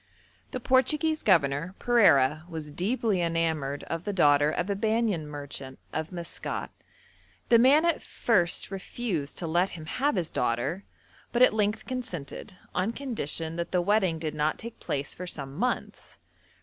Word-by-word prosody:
The 255 - -4
Portuguese 300 +6 +2
governor, 165 -1 +2
Pereira, 155 - +4
was 155 -3 -6
deeply 200 - 0
enamoured 160 -4 -1
of 165 0 -4
the 205 - -2
daughter 145 -5 +4
of 175 +3 -1
a 200 - 0
Banyan 215 -6 0
merchant 140 -2 -7 0.2
of 160 0 -3
Maskat; 170 -2 -5 0.8
the 235 - +7
man 280 +7 +6
at 340 -2 +1
first 185 -5 +1
refused 190 -6 -3
to 175 - -2
let 175 +4 +2
him 155 - -8
have 270 - 0
his 170 -4 -1
daughter, 125 +10 -1 0.5
but 240 +1 +4
at 255 - +6
length 215 0 0
consented, 185 - -6 0.2
on 190 +5 0
condition 165 - -3
that 170 0 -3
the 180 - +2
wedding 190 -2 +2
did 155 -1 -3
not 150 0 0
take 230 0 -9
place 140 0 -3
for 180 - -7
some 140 -5 -3
months. 245 +9 -3
175 Hz, 155 wpm, -28 LUFS, 155-225 Hz, 0.8 s, the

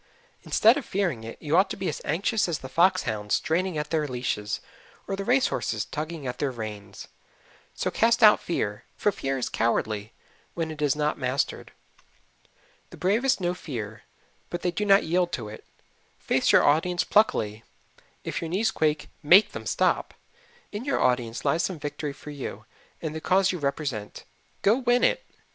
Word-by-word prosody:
Instead 225 +5 +4
of 285 - -3
fearing 175 - -1
it, 115 - -8
you 150 +1 -1
ought 190 +2 +4
to - - -5
be 190 -1 -3
as 150 - -3
anxious 195 +5 0
as 165 - -1
the 130 - -9
fox 170 +8 +3
hounds 105 -3 -1
straining 175 +1 0
at 150 0 -3
their 155 -2 +1
leashes, 120 -5 -2 0.5
or 195 - -2
the 195 - -4
race 255 +5 +3
horses - - -2
tugging 155 -1 -5
at 125 - -4
their 145 - 0
reins. 110 -4 -7 0.7
So - - -1
cast 230 0 +3
out 210 -1 +8
fear, 105 -11 -3
for 205 - +2
fear 135 -7 -2
is 125 - -2
cowardly 110 -2 -1 0.4
when 165 -2 -2
it 155 -1 -8
is 145 -2 +2
not 150 0 -1
mastered. 130 +1 -2 1.2
The - - -12
bravest 225 +8 +2
know 175 -1 0
fear, 115 - -6 0.5
but 175 - -5
they 180 - +1
do 210 +4 -2
not 195 0 +6
yield 175 +2 +1
to 110 -4 -4
it. 110 - -10 0.5
Face - - +1
your - - +6
audience 175 +4 +2
pluckily 110 - +2 0.6
if - - -3
your 165 - -4
knees 195 +4 +1
quake, 155 -1 0
MAKE 180 +8 +6
them - - -7
stop. - - +1 0.6
In 210 +3 -5
your 280 +1 0
audience 120 -3 0
lies 165 - +2
some 185 -1 -2
victory 150 0 -4
for 150 +1 -10
you 140 -3 -7 0.4
and 155 -2 -3
the 160 - -5
cause 190 +2 +3
you 180 - -4
represent. 140 -7 -3 0.4
Go 215 +6 +4
win 245 -1 +2
it. - - +2
155 Hz, 180 wpm, -26 LUFS, 125-190 Hz, 1.2 s, out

